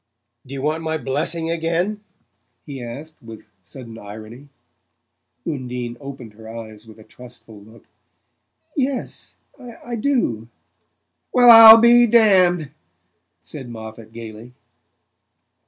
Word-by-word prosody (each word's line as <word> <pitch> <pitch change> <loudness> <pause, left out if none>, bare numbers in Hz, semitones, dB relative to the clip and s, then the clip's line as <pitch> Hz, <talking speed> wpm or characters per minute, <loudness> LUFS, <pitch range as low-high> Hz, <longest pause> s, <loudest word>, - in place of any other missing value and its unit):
"Do 135 - -8
you 135 - -6
want 155 +2 -1
my 160 0 -3
blessing 160 +4 -3
again?" 170 +6 -2 0.6
he 140 -4 -8
asked 145 +7 -10
with 115 -2 -13 0.2
sudden 115 +5 -12
irony. 110 +7 -12 1.0
Undine 125 -5 -5
opened 135 -6 -10
her 110 +1 -14
eyes 110 -1 -11
with 110 - -15
a 110 - -15
trustful 120 -3 -15
look. 110 +2 -19 0.9
"Yes 270 -3 -4 0.2
I 240 -1 -9
do." 215 - -2 0.8
"Well 245 -1 +6
I'll 225 -1 +11
be 240 +1 +5
damned!" 185 -8 +3 0.7
said 135 -5 -10
Moffatt 110 -1 -11
gaily. 115 +1 -11
135 Hz, 110 wpm, -20 LUFS, 115-175 Hz, 1.0 s, I'll